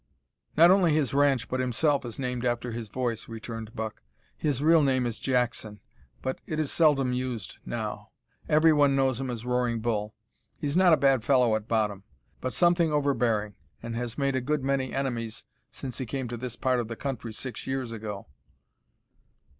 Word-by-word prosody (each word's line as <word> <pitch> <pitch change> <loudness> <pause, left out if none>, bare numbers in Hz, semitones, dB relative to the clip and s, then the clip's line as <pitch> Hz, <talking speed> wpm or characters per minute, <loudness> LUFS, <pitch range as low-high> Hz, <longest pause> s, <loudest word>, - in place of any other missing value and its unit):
"Not 170 +3 +8
only 180 -5 +4
his 145 -5 +1
ranch 140 -3 +3
but 130 - -2
himself 135 +4 +1
is 115 -2 -6
named 125 -2 -3
after 120 0 -1
his 115 -2 -5
voice," 120 -2 -3
returned 115 0 -7
Buck. 110 -1 -5 0.3
"His 145 -4 -1
real 165 +1 +6
name 130 -3 +2
is 115 -2 -3
Jackson, 120 -5 -1 0.4
but 130 0 -3
it 155 - -2
is 155 -3 0
seldom 140 -6 +3
used 125 -5 -4
now. - - -4 0.4
Every 155 +1 +5
one 145 -2 +4
knows 135 -2 +1
him 130 - -3
as 120 -1 -5
Roaring 125 -2 0
Bull. 110 -2 -2 0.4
He's 145 0 -2
not 185 -1 +6
a 160 - +6
bad 135 -5 +3
fellow 125 -3 +4
at 110 0 -4
bottom, 105 -3 0 0.4
but 130 - -3
something 170 -1 +3
overbearing, 120 -8 +1 0.3
and 115 0 -4
has 120 0 -4
made 140 -1 +1
a 130 - 0
good 150 +2 -1
many 135 -1 0
enemies 120 -5 -3 0.2
since 130 -1 -6
he 130 - -3
came 130 +1 -3
to 120 - -4
this 120 0 -5
part 130 -1 +1
of 120 - -2
the 115 - -5
country 125 -3 -4
six 120 +2 -5
years 130 -3 -2
ago." 105 -3 -6
125 Hz, 185 wpm, -27 LUFS, 115-140 Hz, 0.4 s, Not